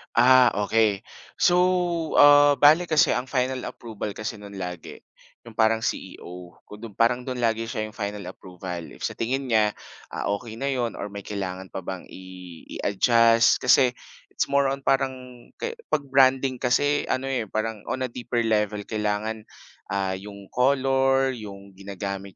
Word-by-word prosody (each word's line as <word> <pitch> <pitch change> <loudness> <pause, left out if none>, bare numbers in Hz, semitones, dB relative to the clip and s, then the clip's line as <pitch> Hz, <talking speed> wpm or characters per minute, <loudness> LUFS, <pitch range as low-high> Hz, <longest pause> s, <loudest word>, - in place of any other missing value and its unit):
Ah, 125 +1 +6 0.2
okey. 105 -1 +1 0.3
So, 175 - +3 0.6
ah, 145 0 +7
bale 155 +5 +5
kasi 155 -1 +3
ang 125 +1 -1
final 130 0 -1
approval 110 -3 -7
kasi 110 0 -5
no'n 100 -1 -11
lagi, 90 -3 -7 0.4
yung 115 - -12
parang 110 0 +2
CEO, 90 -5 -6
kung 105 - -12
do'n 110 -4 -9
parang 120 +2 +2
do'n 125 -1 -4
lagi 115 -1 0
siya 110 - -3
'yung 110 - -11
final 100 -1 -4
approval. 90 -2 -8
If - - -12
sa - - -2
tingin 130 +4 -2
niya, 105 -2 +3 0.4
ah, - - -3
okey 110 0 -10
na 140 +3 -2
'yon 120 -4 -2
or 105 - -6
may 100 - -7
kailangan 95 -2 -5
pa 95 - -6
bang 95 0 -7
i 95 - -11 0.6
i-adjust, 115 +3 +4
kasi 130 0 +5 0.4
it's - - -1
more 140 0 +3
on 135 0 -4
parang 135 -1 +2 0.5
ke 470 0 -4 0.2
‘pag 150 - +1
branding 130 -1 +3
kasi 145 +4 +2
ano 130 +1 -1
eh, 130 -4 -1
parang 110 -1 -3
on 130 - -3
a - - -6
deeper 120 0 -3
level 105 -2 0
kailangan, 110 0 -2 0.5
ah, 95 -1 -1
yung 100 0 -11
color, 135 0 +2
yung 100 -3 -10
ginagamit 100 0 -6
115 Hz, 165 wpm, -24 LUFS, 100-130 Hz, 0.6 s, ah